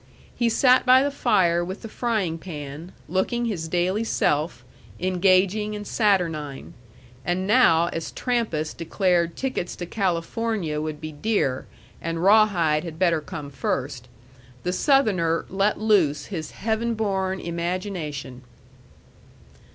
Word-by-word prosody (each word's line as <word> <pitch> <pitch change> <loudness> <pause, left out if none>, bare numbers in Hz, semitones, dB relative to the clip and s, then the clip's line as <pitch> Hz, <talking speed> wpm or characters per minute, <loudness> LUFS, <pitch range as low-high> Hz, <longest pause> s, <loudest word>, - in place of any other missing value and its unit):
He 235 -1 +1
sat 250 +3 +4
by 255 +1 +6
the 285 - 0
fire 175 -10 +2
with 185 +5 -6
the - - -5
frying 215 -8 -1
pan, 150 0 -8 0.2
looking 190 +8 0
his 180 -8 -3
daily 180 +6 0
self 145 - 0 0.3
engaging 185 +3 +2
and 205 0 -6
saturnine. 165 - 0 0.5
And 180 +2 -1
now 190 -7 +5
as 165 - -4
Trampas 220 -12 -1
declared 170 0 0
tickets 260 -9 -3
to 175 - -5
California 180 -2 -1
would 155 -1 -4
be 155 0 -5
dear 145 -6 -1 0.3
and 165 0 -3
Rawhide 190 -7 +4
had 165 -2 -7
better 170 -3 +2
come 150 -4 -7
first, 130 -2 -3 0.6
the 180 - -1
Southerner 185 - +2
let 195 +2 +1
loose 180 -10 +2
his 165 -6 -5
heaven 225 +2 -2
born 190 -3 -1
imagination. 170 -6 -4
180 Hz, 125 wpm, -24 LUFS, 160-215 Hz, 0.6 s, by